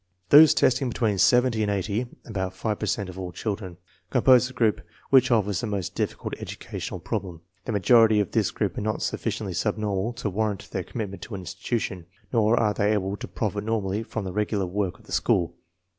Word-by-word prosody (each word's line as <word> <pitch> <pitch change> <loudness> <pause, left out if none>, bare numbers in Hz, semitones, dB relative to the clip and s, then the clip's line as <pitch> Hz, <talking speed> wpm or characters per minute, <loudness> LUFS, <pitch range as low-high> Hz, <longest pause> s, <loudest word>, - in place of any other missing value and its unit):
Those 155 +1 +8
testing 130 +1 +2
between 110 -4 0
70 125 -1 +4
and 105 - +1
80 100 +4 -1 0.2
(about 95 -4 -4
five 105 +2 -2
per - - -2
cent 100 -3 -1
of 95 0 -8
all 90 -1 -5
children) 95 -3 -4 0.3
compose 125 -1 +5
the 130 - -11
group 115 -4 +2 0.3
which 130 -1 +6
offers 105 -6 +1
the - - -3
most 100 -4 -3
difficult - - -3
educational - - -6
problem. 85 -4 -4 0.2
The - - -3
majority 110 +2 +5
of 100 - -1
this - - +2
group - - -2
are - - -3
not 110 0 -2
sufficiently - - -3
subnormal 105 +1 -1
to 120 -2 -4
warrant 105 0 -2
their 95 - -2
commitment 100 -3 -6
to 110 - -7
an 95 - -6
institution, 90 -1 -4 0.3
nor 115 0 +3
are 105 -2 +2
they 105 +1 +1
able 100 -1 -1
to - - -7
profit 105 -1 -3
normally 105 -2 -1
from 110 -2 -5
the 95 - -5
regular 105 -1 0
work 95 0 -2
of - - -21
the - - -15
school. 85 -1 +1
105 Hz, 200 wpm, -25 LUFS, 95-115 Hz, 0.3 s, Those